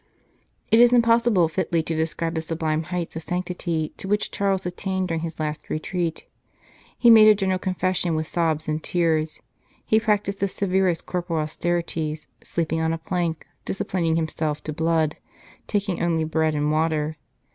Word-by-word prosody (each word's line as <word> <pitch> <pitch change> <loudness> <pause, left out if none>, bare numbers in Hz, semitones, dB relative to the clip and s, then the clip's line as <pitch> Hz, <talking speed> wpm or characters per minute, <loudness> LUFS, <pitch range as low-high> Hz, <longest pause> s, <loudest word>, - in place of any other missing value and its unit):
It 225 - +6
is 240 0 +7
impossible 230 -6 +4
fitly 160 +1 0
to 165 - -2
describe 165 +1 -1
the 160 - -1
sublime 160 -1 -2
heights 175 -1 -4
of 160 - -4
sanctity 175 -2 -3
to - - -6
which 210 +1 0
Charles 195 -2 0
attained 190 +1 -2
during 165 -1 -1
his 165 -1 -6
last 155 -1 -4
retreat. 165 +1 -2 0.7
He 235 - +6
made 220 -1 +9
a 215 - +8
general 190 -2 0
con 185 0 -2
fession 180 -2 0
with 155 0 -1
sobs 160 -1 -1
and 155 0 -1
tears; 160 -2 0 0.4
he 220 - +4
practised 210 -2 0
the 200 - +1
severest 190 -3 0
corporal 175 -3 -2
austerities, 160 -1 -2 0.2
sleeping 160 -1 -2
on 160 0 +1
a - - -2
plank, 170 -1 -2 0.2
disciplining 170 -4 -1
himself 155 -2 -2
to 155 - -4
blood, 160 -1 +1 0.5
taking 200 -3 -1
only 165 -2 +1
bread 160 0 0
and 150 0 +1
water. 155 -1 0
165 Hz, 165 wpm, -24 LUFS, 160-185 Hz, 0.7 s, made